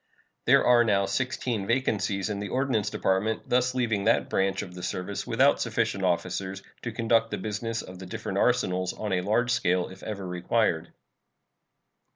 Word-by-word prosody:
There - - +5
are 120 -1 +6
now 100 -3 +2
sixteen 110 0 -2
vacancies 110 -5 0
in 100 - -3
the 100 -1 -4
Ordnance 130 -6 0
Department, 100 +4 0
thus 125 +1 +2
leaving 115 -5 0
that - - +2
branch 95 0 +1
of 90 - -10
the 90 - -8
service 90 +3 -4
without - - +3
sufficient 100 - -1
officers 95 +2 -1 0.2
to 120 - -4
conduct 115 0 +2
the - - -3
business 115 +2 -3
of 90 0 -10
the 95 - -8
different - - -3
arsenals 90 0 +1
on 105 -3 -3
a 90 - +1
large 115 +6 +1
scale 90 -6 +1
if 95 0 -12
ever 100 -3 -5
required. 90 -1 0
100 Hz, 170 wpm, -27 LUFS, 95-115 Hz, 0.2 s, are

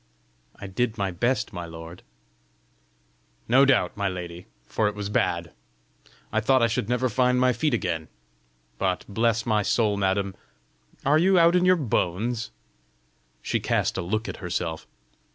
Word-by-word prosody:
"I - - -9
did 110 +4 -1
my 100 -2 -1
best, 120 +4 -1
my 85 -2 -5
lord." 80 +1 -10 1.5
"No 130 +4 +6
doubt, 125 -10 +2
my 100 -1 -1
lady, 90 -1 -7 0.2
for 110 - 0
it 105 - -3
was 105 -1 -4
bad! 85 -5 0 0.8
I 110 - +3
thought 130 +2 +3
I - - +5
should 115 -1 -2
never 125 +1 +1
find 125 +1 +2
my 125 0 +3
feet 150 +7 +1
again! 80 -4 -2 0.7
But, 90 -1 -1
bless 115 +2 +1
my 110 -2 +2
soul, 105 0 +1
madam! 95 0 0 0.7
are 145 +3 +4
you 190 +2 +4
out 170 +1 +5
in 180 0 +3
your 185 0 +6
bones?" 115 - -1 0.9
She - - 0
cast - - 0
a - - -2
look 110 +6 -2
at - - -5
herself. 85 -3 -4
110 Hz, 155 wpm, -25 LUFS, 90-125 Hz, 1.5 s, No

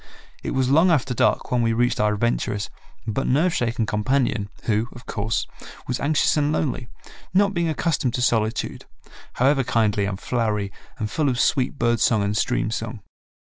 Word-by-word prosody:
It - - -3
was 130 0 +1
long 165 +6 +5
after 135 -6 +2
dark - - +1
when 125 -1 +2
we 115 -1 +2
reached 120 +1 +1
our 105 0 +2
adventurous, 105 -2 -1 0.3
but 115 +4 -2
nerve 165 +7 +2
shaken 115 -4 0
companion 105 -1 0
who, 110 +1 +1
of 120 - -12
course, 110 +2 -1 0.4
was 125 -1 -2
anxious 150 +1 +2
and 150 -1 +1
lonely, 140 -5 -1 0.5
not 200 +1 +4
being 170 -2 0
accustomed 155 -6 0
to 125 - -2
solitude, 110 -2 0 0.5
however 135 +2 +3
kindly 105 -4 +1
and 100 -1 -3
flowery 105 -5 -1 0.3
and 110 -1 -3
full 150 -3 +1
of 125 -2 -1
sweet 135 +1 +1
bird 120 -2 +1
song 110 -3 +3
and 100 +1 -1
stream 110 0 0
song. 115 -1 -4
120 Hz, 175 wpm, -23 LUFS, 110-135 Hz, 0.5 s, long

